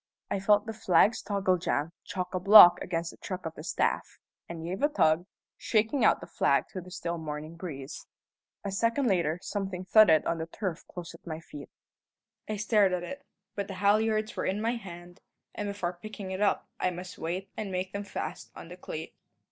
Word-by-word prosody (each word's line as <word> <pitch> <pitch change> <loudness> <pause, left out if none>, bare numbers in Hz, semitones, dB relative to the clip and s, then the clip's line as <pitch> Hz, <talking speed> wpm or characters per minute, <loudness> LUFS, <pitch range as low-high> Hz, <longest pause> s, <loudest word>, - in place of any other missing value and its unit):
I - - 0
felt 205 +1 +3
the 225 - -5
flag's 205 +1 +3
toggle 195 -2 +1
jam 155 -1 -1
chock 180 -1 -4
a 185 - 0
block 180 -2 +9
against 170 -1 -2
the - - -16
truck 185 -2 -6
of 160 - -4
the 155 - -10
staff, - - -1 0.3
and 165 -1 -6
gave 180 +4 -4
a 290 - +4
tug, 175 - +2 0.3
shaking 225 +5 +1
out - - +4
the - - -7
flag - - +1
to 185 - -6
the 180 - -12
still 170 -2 -4
morning 155 +1 -6
breeze. 150 -6 -7 0.6
A 200 - -3
second 230 +7 +1
later 170 -7 +1
something 190 -3 -4
thudded 185 -6 +6
on 165 - -1
the 160 - -4
turf 180 -1 -4
close 175 -2 -8
at 165 - -16
my 160 -1 -4
feet. 145 -3 -11 0.8
I 215 - -1
stared 210 -2 +3
at 180 -1 -1
it; 280 +10 -7 0.3
but 200 -1 -3
the 195 - -6
halliards 215 +2 +2
were - - -2
in 195 +2 0
my 225 +2 0
hand, 175 -4 -10 0.3
and 205 - -4
before 180 -3 -4
picking 210 -2 -7
it 190 +1 -4
up 205 - +1
I - - +1
must 180 +1 -8
wait 180 +4 -4
and 210 -3 -4
make 185 +1 -3
them 200 0 -3
fast 180 -4 -6
on 165 - -10
the 180 - -10
cleat. 160 -3 -7
185 Hz, 205 wpm, -29 LUFS, 170-205 Hz, 0.8 s, block